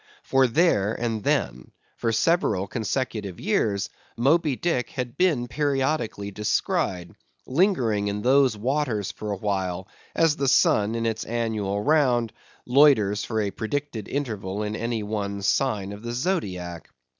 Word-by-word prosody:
For 135 Hz, -1 st, +3 dB
there 115 Hz, -, +2 dB
and 115 Hz, -3 st, -2 dB
then, 65 Hz, -7 st, -1 dB, 0.2 s
for 115 Hz, -, -1 dB
several 115 Hz, -, +2 dB
consecutive 105 Hz, -4 st, -3 dB
years, 110 Hz, -, 0 dB, 0.3 s
Moby 145 Hz, +3 st, +3 dB
Dick 125 Hz, -5 st, -1 dB
had 125 Hz, -2 st, -5 dB
been 150 Hz, -8 st, +2 dB
periodically 135 Hz, -7 st, -1 dB
descried, 95 Hz, -3 st, -1 dB, 0.3 s
lingering 130 Hz, -, +1 dB
in 100 Hz, +1 st, -3 dB
those 130 Hz, -3 st, +4 dB
waters 120 Hz, -3 st, -1 dB
for 105 Hz, -1 st, -6 dB
awhile, 95 Hz, -2 st, -2 dB, 0.3 s
as 165 Hz, -2 st, +3 dB
the 140 Hz, -, 0 dB
sun, 105 Hz, -4 st, +3 dB
in 115 Hz, 0 st, -1 dB
its 110 Hz, -1 st, -1 dB
annual 110 Hz, -4 st, -2 dB
round, 125 Hz, -7 st, +2 dB, 0.3 s
loiters 125 Hz, -7 st, +4 dB
for 110 Hz, -2 st, -1 dB
a 100 Hz, -1 st, -1 dB
predicted 115 Hz, +1 st, -4 dB
interval 105 Hz, -7 st, -3 dB
in 105 Hz, 0 st, -3 dB
any 115 Hz, -1 st, -2 dB
one 100 Hz, -1 st, -3 dB
sign 105 Hz, -3 st, 0 dB
of 100 Hz, +1 st, -8 dB
the 120 Hz, +1 st, -5 dB
Zodiac. 95 Hz, -, -3 dB
115 Hz, 135 wpm, -25 LUFS, 100-135 Hz, 0.3 s, those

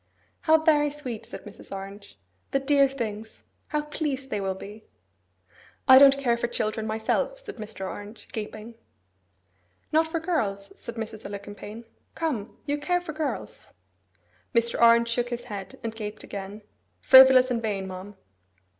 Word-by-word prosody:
'How 320 Hz, 0 st, +5 dB
very 305 Hz, -2 st, +3 dB
sweet!' 270 Hz, -7 st, -7 dB
said -, -, -9 dB
Mrs. 210 Hz, -1 st, -13 dB
Orange. 195 Hz, -, -8 dB, 0.3 s
'The 275 Hz, -, 0 dB
dear 275 Hz, 0 st, +4 dB
things! 220 Hz, -4 st, -6 dB, 0.2 s
How 300 Hz, -1 st, -1 dB
pleased 285 Hz, -3 st, -3 dB
they 210 Hz, -, -1 dB
will 190 Hz, -1 st, -1 dB
be!' 210 Hz, +3 st, -10 dB, 1.0 s
'I 260 Hz, -1 st, +10 dB
don't 275 Hz, 0 st, +8 dB
care 240 Hz, -4 st, +1 dB
for 240 Hz, -, -1 dB
children 220 Hz, -1 st, -2 dB
myself,' 225 Hz, -, -1 dB
said -, -, -9 dB
Mr. 210 Hz, -3 st, -6 dB
Orange, 205 Hz, +3 st, -9 dB
gaping. 215 Hz, +1 st, -6 dB, 1.2 s
'Not 320 Hz, +1 st, +3 dB
for 330 Hz, +1 st, -2 dB
girls?' 210 Hz, -, -2 dB
said 235 Hz, -, -8 dB
Mrs. 220 Hz, -1 st, -6 dB
Alicumpaine. 205 Hz, +3 st, -8 dB, 0.3 s
'Come! 265 Hz, -11 st, -3 dB
you 290 Hz, 0 st, -1 dB
care 355 Hz, +4 st, +1 dB
for 350 Hz, -3 st, -7 dB
girls?' 305 Hz, -2 st, -4 dB, 0.9 s
Mr. 235 Hz, 0 st, +2 dB
Orange 235 Hz, 0 st, +6 dB
shook 240 Hz, +1 st, 0 dB
his 240 Hz, 0 st, -4 dB
head, 195 Hz, -2 st, -7 dB
and 225 Hz, -1 st, -3 dB
gaped 215 Hz, -1 st, -6 dB
again. 200 Hz, +2 st, -7 dB, 0.4 s
'Frivolous 260 Hz, -1 st, +8 dB
and 235 Hz, -2 st, 0 dB
vain, 200 Hz, -4 st, -2 dB
ma'am. 190 Hz, +2 st, -8 dB
235 Hz, 150 wpm, -26 LUFS, 210-275 Hz, 1.2 s, I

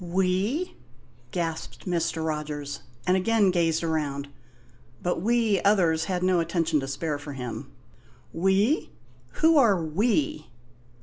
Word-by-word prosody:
"We?" 190 Hz, -, 0 dB, 0.5 s
gasped 165 Hz, +1 st, -4 dB
Mr. 165 Hz, -3 st, -1 dB
Rogers, 150 Hz, -2 st, -4 dB, 0.2 s
and 185 Hz, -, +3 dB
again 205 Hz, 0 st, +3 dB
gazed 165 Hz, -2 st, +1 dB
around; 145 Hz, -3 st, -2 dB, 0.7 s
but 175 Hz, -1 st, -1 dB
we 225 Hz, -3 st, +2 dB
others 170 Hz, -6 st, +3 dB
had 180 Hz, 0 st, -2 dB
no 185 Hz, -1 st, +3 dB
attention 165 Hz, -2 st, +1 dB
to 135 Hz, -, -4 dB
spare 145 Hz, +2 st, -3 dB
for 145 Hz, 0 st, -7 dB
him. 125 Hz, -4 st, -6 dB, 0.6 s
"We? 195 Hz, -, +2 dB, 0.5 s
Who 320 Hz, -1 st, +7 dB
are 210 Hz, -8 st, +4 dB
'we'?" 160 Hz, -, 0 dB
170 Hz, 120 wpm, -26 LUFS, 155-195 Hz, 0.7 s, Who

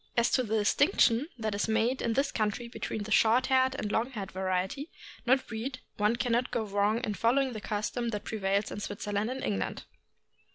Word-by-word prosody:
As 235 Hz, 0 st, +3 dB
to 255 Hz, -, +3 dB
the 220 Hz, -2 st, 0 dB
distinction 255 Hz, -, +3 dB
that 220 Hz, -2 st, -2 dB
is 200 Hz, +2 st, 0 dB
made 225 Hz, +4 st, +1 dB
in 230 Hz, -, 0 dB
this 275 Hz, +4 st, +1 dB
country 220 Hz, +2 st, -1 dB
between 220 Hz, -2 st, -4 dB
the 215 Hz, -, -8 dB
short 230 Hz, +4 st, +4 dB
haired 260 Hz, 0 st, +3 dB
and 210 Hz, -5 st, -3 dB
long 225 Hz, +4 st, +1 dB
haired 205 Hz, -7 st, -6 dB
variety 190 Hz, -, -2 dB, 0.4 s
(not 260 Hz, +1 st, +4 dB
breed), 240 Hz, +4 st, -4 dB, 0.2 s
one 210 Hz, +2 st, +2 dB
can 245 Hz, 0 st, -1 dB
not 240 Hz, +2 st, +2 dB
go 230 Hz, -, -1 dB
wrong 205 Hz, +2 st, +1 dB
in 210 Hz, -, -2 dB
following 255 Hz, +5 st, +2 dB
the 215 Hz, -, -6 dB
custom 215 Hz, +3 st, -2 dB
that 210 Hz, -2 st, -4 dB
prevails 200 Hz, -1 st, -1 dB
in -, -, -5 dB
Switzerland 205 Hz, +1 st, -2 dB
and 260 Hz, +1 st, -4 dB
England. 95 Hz, -2 st, -2 dB
225 Hz, 200 wpm, -30 LUFS, 205-250 Hz, 0.4 s, short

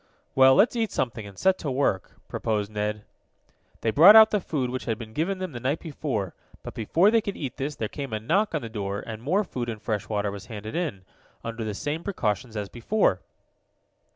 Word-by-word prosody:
"Well, 130 Hz, 0 st, +7 dB
let's 215 Hz, +5 st, +4 dB
eat 225 Hz, -2 st, 0 dB
something, 115 Hz, -4 st, -2 dB
and 100 Hz, -2 st, -13 dB
set 190 Hz, 0 st, +2 dB
to 150 Hz, -, -3 dB
work," 130 Hz, -8 st, 0 dB
proposed 105 Hz, -2 st, -2 dB
Ned. 105 Hz, 0 st, -2 dB, 0.8 s
They 110 Hz, -, +1 dB
brought 175 Hz, -, +9 dB
out 220 Hz, 0 st, +9 dB
the 210 Hz, -, +1 dB
food 135 Hz, -8 st, -2 dB
which 130 Hz, -, -4 dB
had 115 Hz, -2 st, -1 dB
been 110 Hz, -1 st, -9 dB
given 175 Hz, +9 st, -1 dB
to -, -, -10 dB
them 185 Hz, -3 st, -3 dB
the 120 Hz, -, -6 dB
night 135 Hz, +6 st, -1 dB
before, 135 Hz, -, -3 dB, 0.3 s
but -, -, -7 dB
before 165 Hz, -, +3 dB
they 230 Hz, 0 st, +4 dB
could 200 Hz, -2 st, -5 dB
eat 135 Hz, -4 st, -5 dB
this, 140 Hz, +2 st, -3 dB
there 110 Hz, -, -2 dB
came 140 Hz, +2 st, -6 dB
a 110 Hz, -, -2 dB
knock 195 Hz, -, +1 dB
on 150 Hz, -, -2 dB
the -, -, -4 dB
door, 100 Hz, -3 st, -4 dB
and 110 Hz, -1 st, -7 dB
more 180 Hz, -, +1 dB
food 125 Hz, -10 st, -4 dB
and 110 Hz, -2 st, -5 dB
fresh 105 Hz, -2 st, -3 dB
water 105 Hz, -2 st, -1 dB
was 100 Hz, 0 st, -9 dB
handed 110 Hz, 0 st, -7 dB
in, 140 Hz, -, -3 dB, 0.4 s
under 115 Hz, 0 st, -4 dB
the 105 Hz, -2 st, -3 dB
same 150 Hz, +9 st, -3 dB
precautions 110 Hz, -, -2 dB
as 105 Hz, -1 st, -3 dB
before. 120 Hz, -, +1 dB
120 Hz, 220 wpm, -26 LUFS, 105-165 Hz, 0.8 s, brought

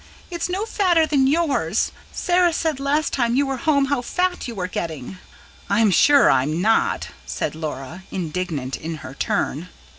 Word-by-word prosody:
It's 345 Hz, 0 st, -3 dB
no 385 Hz, +4 st, -1 dB
fatter 360 Hz, -7 st, +2 dB
than 280 Hz, -4 st, +2 dB
yours. 310 Hz, 0 st, +1 dB, 0.2 s
Sarah 355 Hz, -1 st, +2 dB
said 315 Hz, -4 st, -1 dB
last 285 Hz, +2 st, 0 dB
time 235 Hz, -2 st, +1 dB
you 280 Hz, +2 st, +3 dB
were 270 Hz, -1 st, -2 dB
home 280 Hz, +1 st, +2 dB
how 275 Hz, -2 st, 0 dB
fat 360 Hz, +7 st, -1 dB
you 235 Hz, -, -6 dB
were 185 Hz, -2 st, -2 dB
getting." 165 Hz, -2 st, -5 dB, 0.5 s
"I'm 205 Hz, +1 st, +3 dB
sure 285 Hz, +10 st, +6 dB
I'm 150 Hz, +6 st, +1 dB
not," 220 Hz, +4 st, +1 dB, 0.2 s
said -, -, -3 dB
Laura, 155 Hz, +1 st, -6 dB
indignant 160 Hz, -6 st, -3 dB
in 165 Hz, +1 st, -5 dB
her 130 Hz, -, -8 dB
turn. 155 Hz, +4 st, -2 dB
245 Hz, 160 wpm, -22 LUFS, -, 0.5 s, sure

